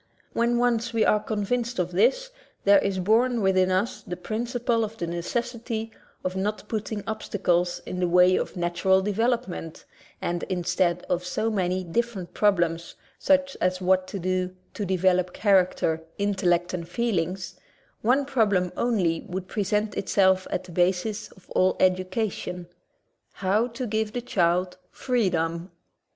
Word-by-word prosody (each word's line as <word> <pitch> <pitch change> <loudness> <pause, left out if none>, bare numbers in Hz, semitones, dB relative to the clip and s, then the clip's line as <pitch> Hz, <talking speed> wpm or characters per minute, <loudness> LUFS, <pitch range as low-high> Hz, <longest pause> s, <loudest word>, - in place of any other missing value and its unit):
When 235 +1 +2
once 235 -1 +1
we 225 -1 +3
are 210 - +4
convinced 230 +3 -2
of 180 -1 -1
this, 255 - +2 0.3
there 200 0 +6
is 195 -1 -1
born 230 +6 +2
within 185 -2 +3
us 190 +7 0
the 180 - -6
principle 235 +3 -1
of 220 +1 -5
the 175 - -2
necessity 225 +6 -3 0.3
of 185 0 -2
not 205 +3 -2
putting 215 -1 -3
obstacles 180 -5 -1
in 180 - -5
the 180 - +2
way 180 +1 +5
of - - -3
natural 180 +2 +2
development, 210 -5 -2 0.3
and 175 0 -2
instead 180 -1 0
of 180 0 0
so 215 +5 -1
many 185 -2 0
different 195 +1 -3
problems, 170 -5 +1 0.2
such 275 -1 +2
as 185 0 +1
what 185 0 +2
to 200 - -5
do 185 0 -1 0.2
to 205 - -3
develop 185 -1 +2
character, 185 -5 +2 0.2
intellect, 185 -3 +1
and 170 -2 -4
feelings, 185 -4 -2 0.4
one 260 +5 +3
problem 205 -9 +1
only 185 -9 +1
would 185 +1 -4
present 210 +1 -1
itself 190 -1 +2
as - - -1
the 185 - -12
V 175 - +1
basis 190 +4 0
of 190 - -21
all 185 0 +2
education 185 -1 0 0.4
— - - -49
how 210 +5 +2
to 250 +1 -5
give 220 -1 -1
the 245 - -2
child 180 -3 0
freedom. 175 -8 -1
190 Hz, 150 wpm, -26 LUFS, 180-225 Hz, 0.4 s, there